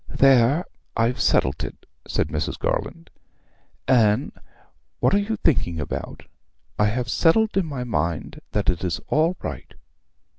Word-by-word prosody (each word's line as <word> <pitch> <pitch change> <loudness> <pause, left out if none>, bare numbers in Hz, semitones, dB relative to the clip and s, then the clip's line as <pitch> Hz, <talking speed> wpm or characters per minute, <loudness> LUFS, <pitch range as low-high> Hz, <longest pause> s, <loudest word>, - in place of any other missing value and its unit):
'There, 135 +4 +4 0.3
I've 115 +2 +1
settled 65 +3 +2
it,' - - -8 0.2
said - - -1
Mrs. - - -3
Garland. 80 - -3 0.8
'Anne, 120 0 +3 0.7
what - - +2
are 200 - +5
you 210 +2 -1
thinking 85 - +1
about? 75 - -5 0.6
I 105 - +4
have 120 +3 -1
settled 210 - +3
in 190 -4 +1
my 135 -4 -4
mind 85 -9 -2
that - - +1
it 85 - -6
is 90 -2 -1
all 165 +4 +2
right.' - - -7
125 Hz, 140 wpm, -23 LUFS, 105-165 Hz, 0.8 s, are